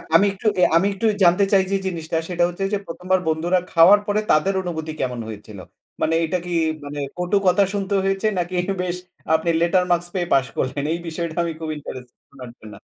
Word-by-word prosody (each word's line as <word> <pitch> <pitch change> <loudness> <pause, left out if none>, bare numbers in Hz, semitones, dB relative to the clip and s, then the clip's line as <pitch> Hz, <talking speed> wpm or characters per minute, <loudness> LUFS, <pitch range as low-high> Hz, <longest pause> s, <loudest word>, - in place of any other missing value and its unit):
আমি 195 - +6
একটু 195 +3 -4
এ - - +3
আমি 175 +4 +4
একটু 195 +3 -4 0.2
জানতে 175 +3 +5
চাই 190 -1 +5
যে - - +2
জিনিসটা 165 -3 -3
সেটা 175 -1 +1
হচ্ছে 180 +2 -5
যে - - +3
১ম 180 +2 -9
বার 185 - +5
বন্ধুরা 170 +3 +1
খাওয়ার 180 +5 +7
পরে 205 +1 +1
তাদের 155 +6 +3
অনুভূতি 160 -3 -4
কেমন 125 -2 -2
হয়েছিল? 105 -2 -9 0.4
মানে 160 - +2
এটা 175 +3 -1
কি 180 - -6 0.3
মানে 145 0 -6 0.2
কটু 180 +3 +1
কথা 195 +2 +5
শুনতে 200 0 -2
হয়েছে 195 +2 0
নাকি 175 +1 -2 0.3
বেশ 180 -1 -2 0.4
আপনি 160 +2 0
লেটার 180 +2 +3
মার্কস 175 0 +2
পেয়ে 175 -2 -1
পাস 135 -1 +4
করলেন? 135 +2 -2
এই 170 - -3
বিষয়টা 165 0 -4
আমি 170 - -2
খুব 160 - -5
ইন্টারেস্টেড 125 -4 -10
শোনার 130 -3 -11
জন্য। 105 -1 -11
170 Hz, 205 wpm, -22 LUFS, 155-185 Hz, 0.4 s, খাওয়ার